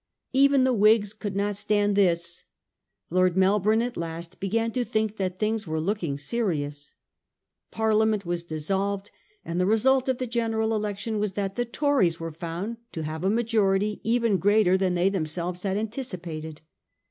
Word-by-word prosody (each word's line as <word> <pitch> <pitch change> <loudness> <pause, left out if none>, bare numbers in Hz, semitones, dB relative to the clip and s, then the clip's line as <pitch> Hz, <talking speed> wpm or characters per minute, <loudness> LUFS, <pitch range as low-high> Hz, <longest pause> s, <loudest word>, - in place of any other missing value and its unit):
Even 275 0 +5
the 260 0 +3
Whigs 215 -1 +4
could 205 -2 -5
not 205 +1 0
stand 205 0 +1
this. 170 -3 +1 0.7
Lord 185 0 +2
Melbourne 210 +4 +3
at 245 0 -4
last 170 +2 -6
began 225 +4 0
to 250 +2 0
think 220 -2 -1
that 185 -1 -2
things 215 -1 -1
were 160 0 -1
looking 170 -4 -1
serious. 150 -6 -3 0.7
Parliament 220 -2 +1
was 175 0 -2
dis 155 -3 -5
solved, 200 +2 -1 0.3
and 170 +2 -1
the 185 - +2
result 260 +5 +3
of 260 - +1
the 255 - -2
general 225 -2 0
election 210 +1 -2
was 205 -2 -1
that 195 0 -3
the 245 - 0
Tories 235 - +1
were 165 0 -4
found 170 +8 -5 0.2
to 160 - -4
have 155 +2 -5
a 190 - +2
majority 210 -2 +1
even 230 -3 +2
greater 205 0 +4
than 190 -1 +1
they 175 +2 +3
themselves 175 0 -3
had 195 0 -1
anticipated. 180 - -5
200 Hz, 165 wpm, -26 LUFS, 175-220 Hz, 0.7 s, Even